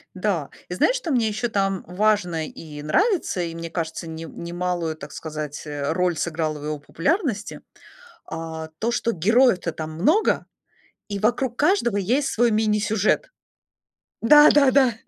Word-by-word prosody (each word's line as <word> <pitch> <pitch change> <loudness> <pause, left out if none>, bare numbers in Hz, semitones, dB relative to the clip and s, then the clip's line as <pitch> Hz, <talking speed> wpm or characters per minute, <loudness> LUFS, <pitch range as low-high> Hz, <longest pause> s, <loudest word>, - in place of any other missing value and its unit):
Да. 185 -7 -1 0.2
И - - -4
знаешь, - - +3
что 355 -11 -3
мне 235 -4 +2
ещё 220 +3 -2
там 195 -2 0
важно 180 -4 +1
и 150 -2 -10
нравится, 330 - +1
и 165 -1 -3
мне 165 0 -6
кажется, 165 0 -4
нем 160 +1 -8
немалую, 175 -2 -2
так 140 -2 -10
сказать, 150 -1 -6
э, 145 -1 -2
роль 180 -2 +1
сыграла 155 -2 -2
в 145 - -10
его 150 -1 -3
популярности, 210 - -2 0.7
а, 160 0 -6
то, 230 +2 0
что 235 - 0
героев-то 195 -1 +3
там 155 0 -6
много 315 - +2 0.6
и 200 -1 -3
вокруг 240 +3 0
каждого 290 - +2
есть 250 +9 +1
свой 240 +1 +2
мини-сюжет. 215 - +1 0.9
Да 295 +6 +8
да 280 -2 +5
да! 260 -4 +4
185 Hz, 150 wpm, -23 LUFS, 160-235 Hz, 0.9 s, Да